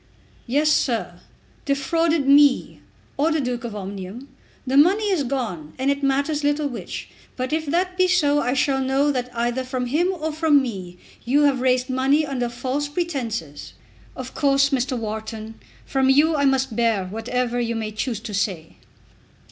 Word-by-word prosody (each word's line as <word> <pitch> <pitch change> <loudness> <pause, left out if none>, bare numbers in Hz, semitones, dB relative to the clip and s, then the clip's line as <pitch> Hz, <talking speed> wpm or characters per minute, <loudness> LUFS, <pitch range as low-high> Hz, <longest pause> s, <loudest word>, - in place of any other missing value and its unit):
"Yes, 295 +5 +2
sir; 210 -12 0 0.4
defrauded 290 +2 +1
me, 280 -1 +4 0.4
or 305 +4 +2
the 315 - +1
Duke 250 -3 -2
of 230 -3 -5
Omnium. 200 +5 -7 0.4
The 260 +1 -1
money 395 +8 +4
is 345 -7 +1
gone, 220 - -4
and 265 +2 +1
it 280 0 -2
matters 280 +2 0
little 290 +1 +1
which. 245 - -7 0.3
But 255 +3 -3
if 315 -1 -1
that 365 +4 0
be 370 0 +4
so 295 -6 +3
I 250 -1 0
shall 270 0 +1
know 270 +2 +2
that 250 -2 -2
either 240 +2 -1
from 255 -1 -3
him 320 +9 +1
or 320 -4 -3
from 310 -1 +3
me 190 -9 -5 0.3
you 280 +5 +3
have 275 -3 +2
raised 255 0 +2
money 270 +3 +2
under 255 -4 -2
false 260 +4 -3
pretences." 255 - -4 0.4
"Of 255 0 -7
course, 275 0 +2
Mr. 260 -1 0
Wharton, 220 0 -5 0.3
from 265 -1 +1
you 300 +4 +4
I 285 -1 +2
must 265 -3 +1
bear 225 -5 +1
whatever 240 +4 -2
you 235 -1 -1
may 220 -1 -3
choose 220 +1 -3
to 220 - -7
say." 185 -5 -3
265 Hz, 170 wpm, -22 LUFS, 235-290 Hz, 0.4 s, me